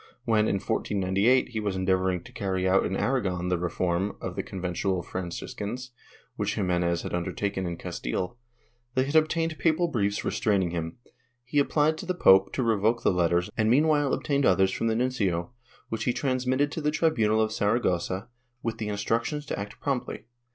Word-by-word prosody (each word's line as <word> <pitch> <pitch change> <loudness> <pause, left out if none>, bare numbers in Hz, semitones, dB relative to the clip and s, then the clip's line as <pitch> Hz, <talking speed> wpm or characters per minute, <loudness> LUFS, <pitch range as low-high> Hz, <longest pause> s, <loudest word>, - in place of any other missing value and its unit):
^ - - -24 0.2
When, 110 -1 +3
in - - +1
1498, 100 +5 +1
he 115 -3 -3
was 100 -3 -2
endeavoring 95 -1 +1
to - - -13
carry 95 -2 -1
out 95 +1 +3
in 95 - -2
Aragon 95 -9 0
the 90 -1 +1
reform 90 +2 -1
of - - -5
the - - -1
Conventual 90 0 -2
Franciscans, 100 +8 -5 0.5
which - - -1
Ximenes 90 -3 0
had - - -5
undertaken 95 +2 -2
in 85 -1 -4
Castile, 90 - -4
and 120 - -40 0.3
they 130 0 +3
had 145 +3 -3
obtained 160 0 +2
papal 170 +1 +2
briefs 100 -9 -1
restraining 95 -5 +1
him, 80 -1 -4 0.5
he 135 +4 +1
applied 150 +2 +2
to 185 - -7
the 185 - 0
pope 95 - +6
to 130 - 0
revoke 115 +1 +1
the - - +4
letters 85 0 +1
and 110 0 +2
meanwhile 145 +2 +3
obtained 140 -1 0
others 95 -3 +4
from 115 - -1
the 110 - +1
nuncio, 115 -6 0 0.4
which 115 - -3
he 125 - +2
transmitted 130 +2 0
to 160 - -4
the 150 - +1
tribunal 140 -9 +2
of 110 0 +1
Saragossa 100 -2 0 0.4
with 115 -1 -3
instructions 115 +8 -1
to - - -4
act 100 0 -7
promptly. 135 -5 -3
105 Hz, 180 wpm, -27 LUFS, 95-130 Hz, 0.5 s, pope